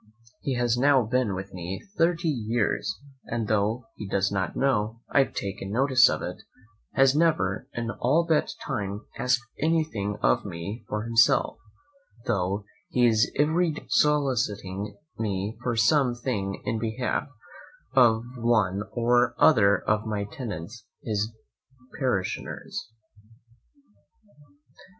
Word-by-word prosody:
He 135 Hz, -, -2 dB
has 120 Hz, -1 st, +1 dB
now 135 Hz, -1 st, +5 dB
been 115 Hz, -3 st, 0 dB
with 95 Hz, +1 st, -7 dB
me 90 Hz, +1 st, -5 dB, 0.2 s
thirty 170 Hz, 0 st, +2 dB
years; 115 Hz, -6 st, -1 dB, 0.3 s
and 115 Hz, -2 st, -3 dB
tho' 110 Hz, +3 st, 0 dB
he 105 Hz, -, -6 dB
does 100 Hz, 0 st, 0 dB
not 95 Hz, -2 st, -2 dB
know 115 Hz, -4 st, 0 dB
I -, -, +4 dB
have 135 Hz, -, +1 dB
taken 100 Hz, 0 st, -4 dB
notice 130 Hz, +3 st, +5 dB
of -, -, -2 dB
it, -, -, -5 dB, 0.5 s
has 135 Hz, 0 st, +4 dB
never 145 Hz, -, +1 dB
in 115 Hz, -1 st, -2 dB
all 150 Hz, +9 st, +1 dB
that 160 Hz, -2 st, +2 dB, 0.2 s
time 105 Hz, -5 st, -3 dB
asked 125 Hz, -1 st, +2 dB, 0.2 s
anything 155 Hz, -11 st, 0 dB
of -, -, +3 dB
me 100 Hz, +7 st, -6 dB
for 105 Hz, 0 st, -2 dB
himself, 115 Hz, 0 st, +3 dB, 0.7 s
tho' 100 Hz, -1 st, 0 dB, 0.3 s
he 125 Hz, -1 st, +3 dB
is 110 Hz, -2 st, +3 dB
every 160 Hz, +3 st, +2 dB
day -, -, -9 dB
soliciting 105 Hz, -9 st, 0 dB, 0.2 s
me 105 Hz, 0 st, -2 dB
for 120 Hz, -2 st, -1 dB
some 125 Hz, +3 st, +3 dB
thing 105 Hz, -6 st, -3 dB
in 115 Hz, -, -1 dB
behalf 115 Hz, +5 st, -2 dB, 0.7 s
of 115 Hz, -3 st, +5 dB
one 110 Hz, -5 st, +2 dB
or 120 Hz, +1 st, +2 dB
other 100 Hz, -10 st, +5 dB
of 105 Hz, +1 st, 0 dB
my 105 Hz, -2 st, -1 dB
tenants 105 Hz, -1 st, -7 dB, 0.2 s
his 110 Hz, -1 st, -1 dB, 0.7 s
parishioners. 115 Hz, -5 st, -3 dB
115 Hz, 125 wpm, -26 LUFS, 100-130 Hz, 0.7 s, now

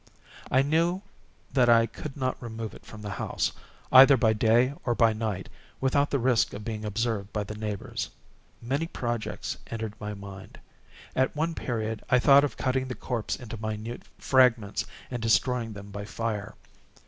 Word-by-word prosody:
I 130 Hz, +1 st, +4 dB
knew 170 Hz, +6 st, +1 dB, 0.5 s
that 125 Hz, -3 st, +4 dB
I 115 Hz, -1 st, +6 dB
could 140 Hz, +4 st, -8 dB
not 130 Hz, -2 st, -2 dB
remove 115 Hz, -2 st, -5 dB
it -, -, -14 dB
from 105 Hz, -1 st, -10 dB
the 105 Hz, -, -4 dB
house, 95 Hz, -, -1 dB, 0.4 s
either 135 Hz, +1 st, +9 dB
by 110 Hz, -3 st, +3 dB
day 115 Hz, +5 st, +3 dB
or 120 Hz, -1 st, 0 dB
by 115 Hz, -2 st, +4 dB
night, 110 Hz, -4 st, -3 dB, 0.3 s
without 140 Hz, +2 st, +2 dB
the 140 Hz, -, +1 dB
risk 125 Hz, -2 st, +2 dB
of 105 Hz, -, -7 dB
being 110 Hz, -2 st, -4 dB
observed 105 Hz, -1 st, -2 dB
by 105 Hz, -, -1 dB
the 105 Hz, -, -7 dB
neighbors. 105 Hz, -2 st, -4 dB, 0.5 s
Many 140 Hz, +7 st, -1 dB
projects 120 Hz, -8 st, -3 dB
entered 110 Hz, -2 st, -4 dB
my 105 Hz, -1 st, -5 dB
mind. 100 Hz, -1 st, -10 dB, 0.6 s
At 130 Hz, +2 st, +1 dB
one 160 Hz, +3 st, 0 dB
period 110 Hz, -6 st, -3 dB
I 125 Hz, -, +5 dB
thought 140 Hz, +2 st, +7 dB
of 145 Hz, -, -2 dB
cutting 130 Hz, 0 st, 0 dB
the 125 Hz, -, -4 dB
corpse 120 Hz, -4 st, -2 dB
into 115 Hz, -2 st, -8 dB
minute 110 Hz, +2 st, -4 dB, 0.2 s
fragments, 125 Hz, -6 st, +3 dB, 0.2 s
and 120 Hz, -2 st, -3 dB
destroying 115 Hz, 0 st, +2 dB
them 100 Hz, 0 st, -10 dB
by 100 Hz, 0 st, -6 dB
fire. 110 Hz, -1 st, -3 dB
115 Hz, 170 wpm, -28 LUFS, 110-130 Hz, 0.6 s, either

